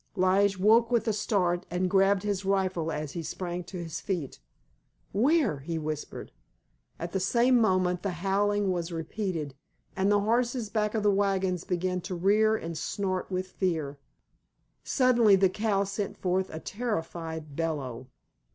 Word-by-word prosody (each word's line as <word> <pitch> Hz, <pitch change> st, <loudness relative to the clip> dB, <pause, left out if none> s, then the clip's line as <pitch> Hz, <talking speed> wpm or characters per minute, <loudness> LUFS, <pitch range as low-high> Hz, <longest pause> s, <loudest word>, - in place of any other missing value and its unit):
Lige 195 Hz, +2 st, +3 dB
woke 225 Hz, +4 st, +4 dB
with 240 Hz, -1 st, +1 dB
a 220 Hz, -, +2 dB
start, 180 Hz, -4 st, 0 dB
and 180 Hz, +2 st, 0 dB
grabbed 195 Hz, +1 st, +3 dB
his 200 Hz, -2 st, -1 dB
rifle 190 Hz, -4 st, 0 dB
as 150 Hz, -2 st, -4 dB
he 170 Hz, -, -4 dB
sprang 175 Hz, +2 st, -4 dB
to 185 Hz, -, -8 dB
his 165 Hz, -1 st, -5 dB
feet. 175 Hz, -9 st, -3 dB, 0.7 s
"Where?" 250 Hz, -, +2 dB
he 165 Hz, +4 st, -4 dB
whispered. 155 Hz, -1 st, -5 dB, 0.7 s
At 170 Hz, +1 st, -5 dB
the 190 Hz, -, -1 dB
same 240 Hz, +5 st, +3 dB
moment 185 Hz, -4 st, +2 dB
the 200 Hz, -, -1 dB, 0.2 s
howling 205 Hz, 0 st, +2 dB
was 175 Hz, -1 st, -2 dB
repeated, 165 Hz, -3 st, -3 dB, 0.4 s
and 195 Hz, +1 st, +2 dB
the 205 Hz, 0 st, +4 dB
horses 235 Hz, 0 st, 0 dB
back 210 Hz, 0 st, 0 dB
of 215 Hz, -, 0 dB
the 205 Hz, -, +4 dB
wagons 190 Hz, -3 st, 0 dB
began 180 Hz, 0 st, -1 dB
to 185 Hz, +1 st, -5 dB
rear 210 Hz, +5 st, +3 dB
and 165 Hz, -5 st, -5 dB
snort 185 Hz, +3 st, -2 dB
with 185 Hz, 0 st, -2 dB
fear. 155 Hz, -7 st, -2 dB, 0.8 s
Suddenly 240 Hz, -6 st, +4 dB
the 190 Hz, 0 st, +4 dB
cow 205 Hz, 0 st, 0 dB
sent 200 Hz, +1 st, -4 dB
forth 185 Hz, +1 st, 0 dB
a 160 Hz, -, -6 dB
terrified 165 Hz, -8 st, -4 dB
bellow. 135 Hz, -7 st, -3 dB
190 Hz, 155 wpm, -28 LUFS, 170-205 Hz, 0.8 s, woke